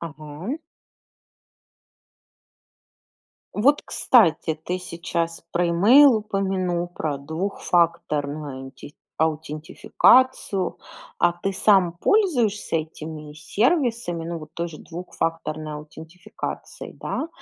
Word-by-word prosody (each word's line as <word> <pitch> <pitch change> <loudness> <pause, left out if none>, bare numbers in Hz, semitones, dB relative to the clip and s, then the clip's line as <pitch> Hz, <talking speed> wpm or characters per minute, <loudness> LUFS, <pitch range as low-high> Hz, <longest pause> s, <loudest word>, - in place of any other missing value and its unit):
Ага. 155 - -6 3.0
Вот, 280 +8 +3
кстати, 165 -9 +3
ты 180 +1 -2
сейчас 170 -1 -4
про 175 0 +1
имейл 235 +10 +7
упомянул, 190 -4 -1
про 155 -4 -3
двухфакторную 150 -4 -1
аутин 135 - -12 0.3
аутентификацию. 165 - +2 0.4
А 175 - +4
ты 175 +3 -3
сам 190 -3 +4
пользуешься 240 - +1
этими 155 -1 -6
сервисами, 230 - 0
ну, 170 0 -4
вот 155 -1 -11
той 170 0 -3
же 155 -2 -11
двухфакторной 165 -3 -4
аутентификацией, 155 +3 -8
да? 320 - -3
170 Hz, 85 wpm, -23 LUFS, 155-200 Hz, 3.0 s, имейл